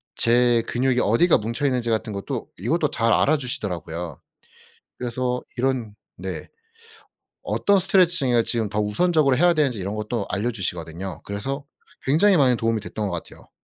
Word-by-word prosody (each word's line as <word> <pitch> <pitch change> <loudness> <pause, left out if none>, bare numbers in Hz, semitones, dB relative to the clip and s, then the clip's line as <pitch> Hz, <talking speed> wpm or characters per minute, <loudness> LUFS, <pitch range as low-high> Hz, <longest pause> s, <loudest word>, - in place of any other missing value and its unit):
제 120 0 +4
근육이 125 0 +1
어디가 120 - +4
뭉쳐 115 +7 -3
있는지 125 -4 0
같은 110 -1 -1
것도 100 0 -5
이것도 150 - 0
잘 115 -3 +2
알아주시더라고요. 90 - -1 0.8
그래서 125 +1 -2 0.2
이런 120 -5 -1 0.2
네 - - -6 0.9
어떤 200 -1 +2
스트레칭을 175 -11 +3
지금 110 -4 -1
더 105 - -2
우선적으로 140 +5 +2
해야 175 +2 +5
되는지 140 -9 +1
이런 100 +3 -4
것도 105 0 -3
알려 105 +4 -1
주시거든요. 90 -3 -4
그래서 135 +8 -4 0.4
굉장히 180 +8 +4
많은 125 -4 +4
도움이 115 -1 0
됐던 105 0 -4
것 - - -4
같아요. - - -17
120 Hz, 360 characters per minute, -23 LUFS, 105-135 Hz, 0.9 s, 해야